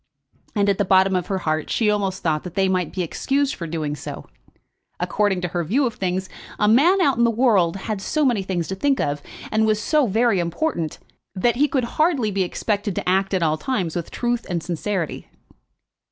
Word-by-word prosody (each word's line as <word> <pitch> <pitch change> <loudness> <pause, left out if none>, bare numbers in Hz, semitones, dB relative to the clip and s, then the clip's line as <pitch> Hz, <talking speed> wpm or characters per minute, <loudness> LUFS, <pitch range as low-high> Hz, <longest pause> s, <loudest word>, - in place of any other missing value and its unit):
And 205 -1 +2
at 200 -1 +1
the - - +4
bottom 190 +1 +4
of 180 - -1
her 195 - -1
heart 155 -3 -2
she 225 - +1
almost 195 -2 -1
thought 155 -2 +1
that 180 -1 -9
they 195 -1 +2
might 185 -3 0
be 185 - -2
excused 275 - 0
for 170 - -6
doing 155 -2 -3
so. - - -7 0.7
According 200 -3 0
to 180 - -2
her 175 +1 -2
view 245 - +1
of 235 - -1
things, 185 -1 -2 0.3
a 210 - +2
man 300 - +5
out 280 -8 +3
in - - +4
the 235 - +4
world 215 -8 +3
had 195 +1 -4
so 305 +7 0
many 240 -6 +2
things 185 -3 -2
to 190 - -2
think 275 +7 +1
of, 145 0 -1 0.3
and 220 0 +2
was 215 -1 +2
so 295 +4 +2
very 225 -1 +2
important, 170 - -2 0.4
that 235 +5 +1
he 295 +3 +4
could 270 -4 0 0.2
hardly 285 -10 +2
be 195 0 -1
expected 205 +2 -1
to - - -3
act 190 +1 +2
at 180 - +1
all 155 -1 +1
times 190 -10 -2
with 170 -2 -3
truth 240 -1 -1
and 170 -3 -2
sincerity. 175 +1 -3
195 Hz, 210 wpm, -22 LUFS, 175-235 Hz, 0.7 s, man